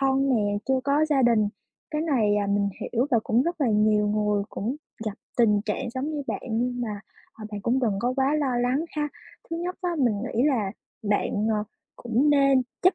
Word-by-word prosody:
thân 270 0 +2
nè, 205 -2 +1
chưa 265 -1 +3
có 285 +2 +3
gia 285 -3 +2
đình. 230 -4 +4 0.4
Cái 300 - -1
này, 225 -10 +2
à, 205 -1 0
mình 200 0 +1
hiểu 245 +3 0
và 235 - +4
cũng 235 +3 +3
rất 340 +1 -3
là 265 - +3
nhiều 210 0 +3
người 210 -1 +1
cũng 235 +7 -3 0.3
gặp 210 - -1 0.2
tình 210 -4 +4
trạng 230 +3 -2
giống 260 +5 -3
như 300 -2 -3
bạn - - -3
nhưng 245 +2 -1
mà, 210 -4 -3 0.3
ờ, 220 - -11
bạn 205 - -4
cũng 250 +3 +2
đừng 225 -5 +2
có 245 +3 +1
quá 270 +2 +2
lo 265 -5 0
lắng 250 +6 +1
ha. 295 0 0 0.4
Thứ 330 - -2
nhất 355 +2 -3
á, 355 - 0
mình 240 -6 +3
nghĩ 245 -1 -1
là 230 -10 +1 0.3
bạn, 210 0 0
ờ, 210 0 0 0.3
cũng 245 +5 +1
nên 275 -2 +4 0.2
chấp 370 +1 +5
245 Hz, 215 wpm, -26 LUFS, 210-275 Hz, 0.4 s, chấp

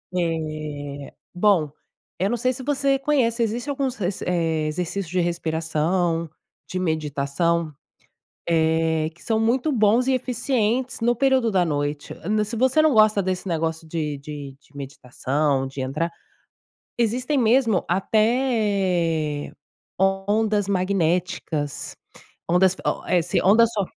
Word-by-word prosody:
Eh 155 -4 -3 0.2
bom, 180 -6 +2 0.5
eu 195 +2 +1
não 240 - 0
sei 255 +2 +1
se 260 - -8
você 275 -1 +1
conhece. 255 -5 +1
Existe 235 +6 -2
alguns 270 -2 -1
reser 190 -4 -3
eh, 160 -3 0
exercícios 180 +4 -3
de 185 +1 0
respiração, 165 0 -1 0.4
de 185 - -3
meditação, 155 0 -1 0.8
eh, 160 -1 +2
que - - -18
são 220 -1 0
muito 245 +7 +1
bons 230 +2 +3
e 265 - +3
eficientes 250 0 -1
no 240 +1 +2
período 260 -3 +2
da 185 -2 +3
noite. 145 -1 -2
Hã, 210 +3 +1
se 220 +3 -5
você 260 +6 +3
não 310 -3 +4
gosta 215 -2 +5
desse 185 0 -3
negócio 160 -1 -2
de 155 -3 -3
de 140 -2 -8
de 145 - -27
meditação, 135 0 -2
de 135 0 -6
entrar 150 +6 -2 0.9
existem 250 +5 0
mesmo 230 -4 +3
até 195 - +1 0.5
ondas 205 +2 +1
magnéticas, 180 -5 -1 0.5
ondas 185 +1 +4
o - - -1
eh 175 -1 +3
si - - 0
ondas 225 +4 +5
so 200 -3 0
185 Hz, 130 wpm, -23 LUFS, 160-225 Hz, 0.9 s, gosta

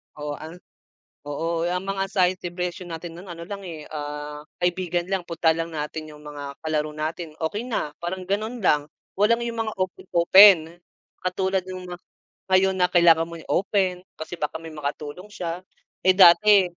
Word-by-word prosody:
Oo 150 0 -5
ang 160 +2 -9 0.7
oo 165 +3 -2
ang 180 +1 -1
mga 195 0 -1
sign 185 -2 +3
of - - -77
depression 180 0 -4
natin 165 0 -6
ng 185 +1 -11
ano 170 -1 -8
lang 200 +3 -6
eh, 160 -3 -7
ah, 150 0 -5 0.2
kaibigan 175 -1 0
lang 190 -3 -1
puntahan 165 -1 +1
lang 170 - -11
natin 155 +1 -4
yung 150 -1 -13
mga 145 -1 -7
kalaro 155 -1 -1
natin 155 +1 -4
okey 205 +9 -3
na, 150 -10 -2
parang 185 +2 -4
ganon 215 +5 -2
lang, 150 -5 +3 0.3
walang 230 +4 +3
yung 230 -1 -3
mga 215 - -3
open-open. 180 -1 +5 0.4
Katulad 190 +1 0
nung 185 0 -6
mga 175 - -6 0.5
ngayon 190 0 +4
na 180 -1 +3
kailangan 165 -2 +5
mo 170 0 -8
i-open, 185 +1 0 0.2
kasi 160 +2 -6
baka 160 -1 -3
may 165 0 -10
makatulong 150 +6 -6
siya, 175 -3 -5 0.4
eh, 185 - +5
dati, 195 +2 +7
175 Hz, 170 wpm, -24 LUFS, 160-190 Hz, 0.7 s, dati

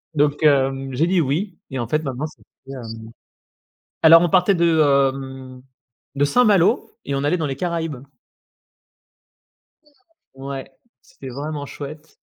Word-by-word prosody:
Donc 145 +1 +1
hem, 135 -2 +2
j'ai 155 +7 +1
dit: 185 -1 +2
«Oui» 165 +7 -2
et 130 - -3
en 120 - -3
fait 155 +6 0
maintenant 135 +1 -3
ça 155 - -18 0.2
fait, 135 - -10
hem 115 -3 -8 1.0
alors 165 +1 +9
on 175 - +2
partait 185 +3 +3
de, 170 -2 +2
hem, 135 -2 0 0.6
Saint-Malo 210 - +3 0.2
et 140 - -2
on 140 +1 -2
allait 150 +5 +1
dans 160 - -1
les 135 -2 -4
Caraïbes. 165 -5 -3 2.3
Ouais, 135 0 -7 0.3
c'était 135 - -12
vraiment 145 +3 -5
chouette, 150 +3 -10
145 Hz, 135 wpm, -21 LUFS, 135-165 Hz, 2.3 s, alors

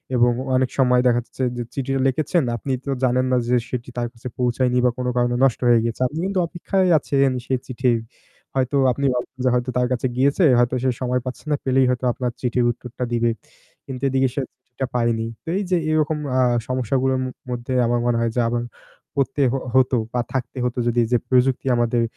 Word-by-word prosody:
এবং 120 0 +4 0.2
অনেক 130 0 +2
সময় 125 -2 +4
দেখা 120 0 +3
যাচ্ছে 130 - -5
যে 120 - -2
চিঠিও 135 0 -2
লিখেছেন 155 +5 +1
আপনি 135 - -5
তো 140 - -2
জানেন 130 0 +2
না 125 - +3
যে 125 - +3
সেটি 125 -1 -4
তার 120 0 -1
কাছে 120 +1 -9
পৌঁছায়নি 125 0 +1
বা 125 - +5
কোন 125 0 -2
কারণে 120 0 +2
নষ্ট 135 -3 +3
হয়ে 120 -1 +6
গিয়েছে, 115 +1 -3
আপনি 150 +5 -6
কিন্তু 195 -1 0
অপেক্ষায় 185 +2 0
আছেন 140 -1 +2 0.2
সে 130 - -2
চিঠির। 125 -2 0 0.6
হয়তো 130 +1 +1
আপনি 140 +3 -2
ভাবতেছেন 125 +1 -5
যে - - +5
হয়তো 125 +1 -1
তার 125 0 +2
কাছে 125 +1 0
গিয়েছে, 140 +7 +2 0.2
হয়তো 120 +1 +2
সে 130 - +2
সময় 125 0 0
পাচ্ছে 130 +4 -6
না, - - +4
পেলেই 130 0 +3
হয়তো 125 0 -1
আপনার 125 0 -2
চিঠির 125 -1 +1
উত্তরটা 125 +1 -7
দিবে। 120 0 +2 0.6
কিন্তু 130 -1 -7
এদিকে 135 0 +2
সে 140 - 0 0.2
চিঠিটা 130 +1 -5
পায়নি। 115 -2 +1 0.3
এই 200 - 0
যে 180 - +4
এরকম 155 0 +1 0.2
আ - - +4 0.3
সমস্যাগুলার 130 +1 0 0.3
মধ্যে 120 +1 -4
আমার 120 +1 +1
মনে 120 -1 +2
হয় 115 -1 0
যে - - +1
আমার 120 0 -1 0.5
করতে 140 +1 0
হ - - 0 0.2
হতো 130 -1 +4 0.2
বা 125 - +1
থাকতে 130 0 -3
হতো 125 0 -2
যদি 120 0 +2
এই - - -7
যে - - +6
প্রযুক্তি 130 0 +2
আমাদের 120 0 +1
125 Hz, 205 wpm, -22 LUFS, 120-135 Hz, 0.6 s, হয়ে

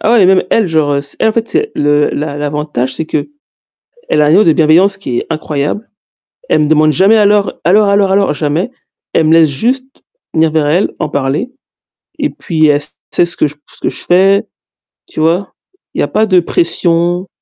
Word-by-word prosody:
Ah 225 - +1
oui, 205 -5 +5
même 190 0 +4
elle, 225 -4 +2
genre, 155 -3 0
heu, 140 - 0 0.2
elle 220 - +2
en - - 0
fait 230 0 -2
c'est 435 - -1
le 145 0 +1
l'a 145 -1 -4
l'avantage, 145 -3 -3
c'est 160 - -3
qu'elle 155 - -3 0.9
a - - +3
un - - +2
niveau 185 +7 +5
de 160 - +3
bienveillance 175 +6 +3
qui 130 -11 -3
est - - -6
incroyable. 155 +6 -3 0.6
Elle 150 -1 +2
demande 155 0 +3
jamais 195 +7 +3
alors 205 -1 +2
alors 205 +4 +3
alors 200 -1 +2
alors, 195 -5 +2
jamais. 155 +10 -2 0.4
Elle 160 - +2
me 160 - +3
laisse 165 -2 +5
juste 250 - -1 0.5
venir 160 -1 +2
vers 155 -2 0
elle, 170 +7 +1
en 150 - -2
parler 145 - -2 0.7
et 295 - 0
puis, 160 -4 -1
elle 145 0 +2 0.3
sait 175 - +2
ce 170 - -6
que - - +2
ce 150 - -5 0.3
que - - -2
je - - -4
fais, 195 +3 +3 0.6
tu - - -8
vois? 170 +5 0 0.4
Il - - -5
y - - +2
a - - 0
pas 215 - +1
de 185 -4 +3
pression. 175 +1 0
165 Hz, 200 wpm, -12 LUFS, 150-200 Hz, 0.9 s, oui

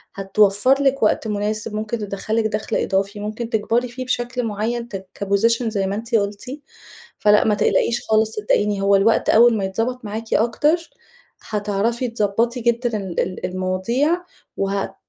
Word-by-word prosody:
هتوفر 205 +7 +3
لِك 275 -1 +2
وقت 220 - +2
مناسب 210 +1 -2
ممكن 215 +2 -2
تدخّل 205 +1 -4
لِك 225 -1 +1
دخل 215 0 -3
إضافي 200 +2 -1
ممكن 215 +3 -4
تكبري 230 +3 0
فيه 255 +2 -7
بشكل 245 0 -2
معين 230 +2 -2 0.3
كposition 230 +4 +2
زي 200 -3 -1
ما 200 - -2
أنتِ 230 +2 -3
قُلتِ، 205 +1 -1 0.7
فلأ 210 0 +4
ما 210 - +3
تقلقيش 235 +3 +1
خالص 220 0 +2
صدقيني 210 -1 +1
هو 200 0 +4
الوقت 215 +4 +2
أول 235 0 +6
ما 195 - -1
يتضبط 225 +5 -2
معاكِ 220 +2 -4
أكتر 300 +9 +1 0.6
هتعرفي 215 +4 -1
تضبطي 230 +2 0
جدًا 235 -1 0
ال 190 -4 -3
ال 185 0 -3
المواضيع 190 - 0 0.3
وهت 195 0 -2
215 Hz, 150 wpm, -21 LUFS, 200-235 Hz, 0.7 s, أول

